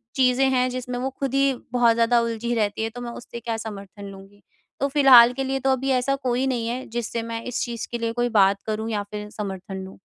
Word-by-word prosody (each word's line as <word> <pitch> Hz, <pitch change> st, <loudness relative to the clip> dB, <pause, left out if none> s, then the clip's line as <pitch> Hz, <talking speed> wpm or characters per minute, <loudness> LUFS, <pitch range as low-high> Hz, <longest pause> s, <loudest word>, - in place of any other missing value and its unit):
चीज़ें 260 Hz, 0 st, +3 dB
हैं 255 Hz, -1 st, +2 dB
जिसमें 250 Hz, 0 st, -4 dB
वो 265 Hz, -, -1 dB
खुद 275 Hz, -2 st, -2 dB
ही 275 Hz, 0 st, +3 dB, 0.2 s
बहुत 240 Hz, -2 st, +4 dB
ज़्यादा 235 Hz, +1 st, +3 dB
उलझी 230 Hz, +1 st, -2 dB
रहती 210 Hz, 0 st, 0 dB
है 225 Hz, -, -1 dB
तो 245 Hz, -, -6 dB
मैं 240 Hz, -1 st, -5 dB
उससे 235 Hz, 0 st, -9 dB
क्या 230 Hz, -1 st, -3 dB
समर्थन 205 Hz, -2 st, -8 dB
लूँगी? 195 Hz, +1 st, -12 dB, 0.4 s
तो 280 Hz, -, +1 dB
फिलहाल 260 Hz, -4 st, +7 dB
के 270 Hz, +1 st, -3 dB
लिए 270 Hz, 0 st, -1 dB
तो 270 Hz, +1 st, +1 dB
अभी 265 Hz, +1 st, 0 dB
ऐसा 275 Hz, +2 st, 0 dB
कोई 255 Hz, -1 st, -1 dB
नहीं 240 Hz, -3 st, -1 dB
है, 250 Hz, +2 st, -3 dB
जिससे 235 Hz, 0 st, -3 dB
मैं 230 Hz, 0 st, -5 dB
इस 250 Hz, -, -2 dB
चीज़ 235 Hz, -2 st, -5 dB
के 240 Hz, -, -2 dB
लिए 230 Hz, 0 st, -1 dB
कोई 240 Hz, 0 st, 0 dB
बात 195 Hz, 0 st, +4 dB
करूँ 220 Hz, +1 st, -2 dB
या 205 Hz, -1 st, -1 dB
फिर 210 Hz, 0 st, -6 dB
समर्थन 195 Hz, -1 st, -6 dB
लूँ। 190 Hz, -, -12 dB
235 Hz, 235 wpm, -24 LUFS, 215-255 Hz, 0.4 s, फिलहाल